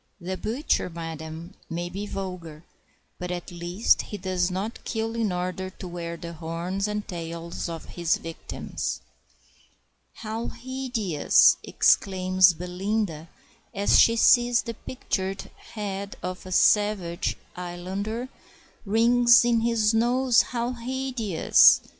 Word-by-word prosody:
The 185 +1 -4
butcher, 230 - -1
madam, 165 +1 -7 0.2
may 175 +1 -3
be 200 +4 -5
vulgar, 180 -6 -6 0.6
but 180 - -4
at 180 +1 -5
least 175 +5 +1
he 210 - -7
does 185 -1 -1
not 195 +5 -4
kill 225 0 -3
in 225 -4 0
order 185 +1 -3
to 185 0 -10
wear 170 -1 -5
the 170 0 -7
horns 170 +5 -3
and 210 0 -3
tails 170 -1 -5
of 165 -1 -6
his 170 -1 0
victims. 165 0 -5 1.1
"How 225 +1 -5
hideous!" 245 - +2
exclaims 185 -1 +3
Belinda, 180 -1 -3 0.5
as 200 +1 +4
she 230 - +6
sees 240 +1 +5
the 230 - -5
pictured 195 -5 -4
head 200 -2 -6
of 185 0 -4
the 185 - -10
savage 195 -3 +2 0.2
islander, 190 +7 -4 0.6
"rings 235 +3 +5
in 235 -1 +3
his 225 -2 +2
nose! 245 +2 +4
how 240 0 -3
hideous!" 245 -6 +3
190 Hz, 120 wpm, -26 LUFS, 175-225 Hz, 1.1 s, she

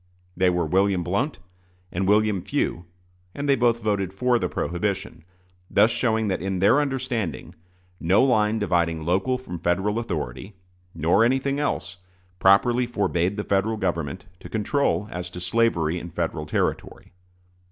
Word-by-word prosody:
They 90 0 +3
were 90 -1 0
William 95 +2 +2
Blount 110 - -1 0.5
and 95 +2 -1
William 105 -2 +3
Few; 85 0 -2 0.5
and 145 0 -3
they 140 - +5
both 120 -2 +1
voted 100 -3 0
for 120 +5 +1
the - - -1
prohibition 95 -1 -3 0.5
thus 110 +3 +4
showing 110 -2 0
that 95 - -1
in 95 0 -2
their 105 +10 +4
understanding 125 - -3 0.5
no 95 +8 +3
line 110 -4 +2
dividing 85 -6 0
local 95 +10 +1
from 90 -9 -7
Federal 95 +6 0
authority, 85 - -5 0.4
nor 85 +7 +3
anything 135 +3 +1
else, 95 - -2 0.4
properly 120 +6 +4
forbade 100 -4 0
the 105 - -2
Federal 100 +3 0
Government 85 -4 -3
to - - -11
control 110 0 0
as 90 0 -5
to 90 - -8
slavery 90 -4 +1
in 85 - -8
Federal 80 -2 -3
territory. - - -2
100 Hz, 145 wpm, -24 LUFS, 90-115 Hz, 0.5 s, they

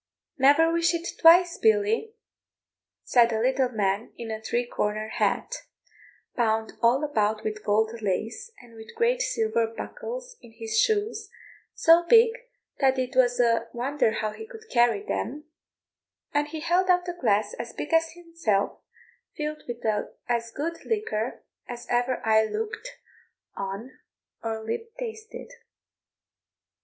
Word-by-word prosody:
"Never 290 +5 +5
wish 335 0 +2
it 335 +1 -4
twice, 345 +1 +6
Billy," 220 - +2 0.9
said 240 -2 +4
a 220 - 0
little 260 +2 +2
man 205 -2 -1
in 230 -1 -6
a 220 0 -5
three 240 +2 -1
cornered 215 -1 -2
hat, - - 0 0.8
bound 220 -2 0
all 245 +5 +3
about 215 -7 0
with 215 0 -4
gold 220 +1 +2
lace, 220 - -3
and 235 -1 -17
with 220 - -12
great 475 +2 +2
silver 225 - 0
buckles - - -7
in 230 - -16
his 225 -1 -2
shoes, 430 0 0 0.5
so 330 +1 +6
big 460 0 +7 0.5
that 265 -1 +3
it 255 -1 -2
was 245 -1 +3
a 230 -1 +2
wonder 260 +1 +1
how 215 0 -2
he 440 - -9
could 445 -2 -13
carry 235 -4 +3
them, 290 +5 -3 0.9
and 295 0 +1
he 310 +1 -6
held 355 +3 +1
out 360 0 +3
a 355 - -2
glass 210 -9 +1
as 235 0 -5
big 300 - -6
as 325 0 +3
himself, 335 - -2 0.6
filled 305 0 -4
with 240 -1 -6 0.4
as 235 -1 -1
good 325 +8 -5
liquor 255 - -2 0.2
as 240 -1 -7
ever 245 +1 0
eye 220 0 +5
looked 445 - -5 0.6
on 195 +6 -6 0.4
or 225 -1 -4
lip 455 - -5
tasted. 450 -1 -7
245 Hz, 140 wpm, -26 LUFS, 220-340 Hz, 0.9 s, big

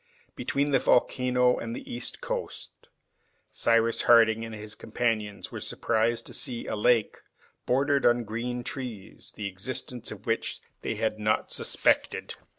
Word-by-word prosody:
Between 140 +1 0
the 135 - +4
volcano 125 0 +3
and 115 0 -4
the - - -8
east 120 0 -3
coast - - -5 0.6
Cyrus 115 0 +3
Harding 115 -1 +5
and 115 -1 -6
his 105 0 -6
companions 110 -4 -2
were - - -6
surprised 115 +1 0
to - - -9
see 120 -2 -3
a - - -3
lake, 110 +1 +2 0.5
bordered 140 +2 +2
with 120 -1 +3
green 120 +3 -3
trees, 120 -8 -7
the 105 - -5
existence 120 +5 -4
of 105 0 -9
which 115 0 -1 0.2
they - - -2
had 110 -1 -1
not 105 0 0
suspected. - - +1
115 Hz, 145 wpm, -28 LUFS, 110-125 Hz, 0.6 s, Harding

